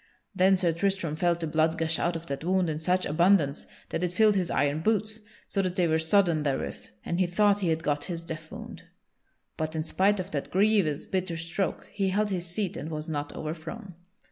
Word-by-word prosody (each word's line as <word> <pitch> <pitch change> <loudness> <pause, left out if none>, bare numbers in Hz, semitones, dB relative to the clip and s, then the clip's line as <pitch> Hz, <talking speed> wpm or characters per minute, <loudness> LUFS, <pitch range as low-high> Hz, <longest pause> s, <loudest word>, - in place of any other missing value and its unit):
Then 190 0 +4
Sir 180 -2 +2
Tristram 180 -3 -1
felt 170 +1 +1
the - - -1
blood 160 +1 +1
gush 160 0 +1
out 170 0 0
of 165 0 -5
that 140 -1 -5
wound 180 -1 +1
in 155 - -3
such 180 +3 +1
abundance 155 -2 +2 0.2
that 175 - -2
it 180 - 0
filled 210 +3 +4
his 185 -3 +1
iron 145 +1 +1
boots, 215 +4 0 0.3
so 195 - 0
that 185 -1 -2
they 180 -3 +2
were 160 0 +2
sodden 165 -1 +3
therewith, 140 -2 -3 0.2
and 170 - -1
he 185 - +3
thought 205 +3 +3
he 190 - -1
had 160 0 0
got 145 -1 0
his 170 -2 -5
death 160 -1 -7
wound. - - -9 0.7
But 155 0 -3
in 155 - -1
spite 195 +5 +2
of 185 +1 -5
that 140 - -3
grievous 195 -6 +2
bitter 185 -3 -2
stroke, 165 +4 -3
he 195 -2 0
held 205 +2 0
his 180 -2 -2
seat 180 +2 -3
and 150 - -5
was 155 0 -5
not 145 -1 -3
overthrown. 165 +6 -6
170 Hz, 215 wpm, -28 LUFS, 160-190 Hz, 0.7 s, Then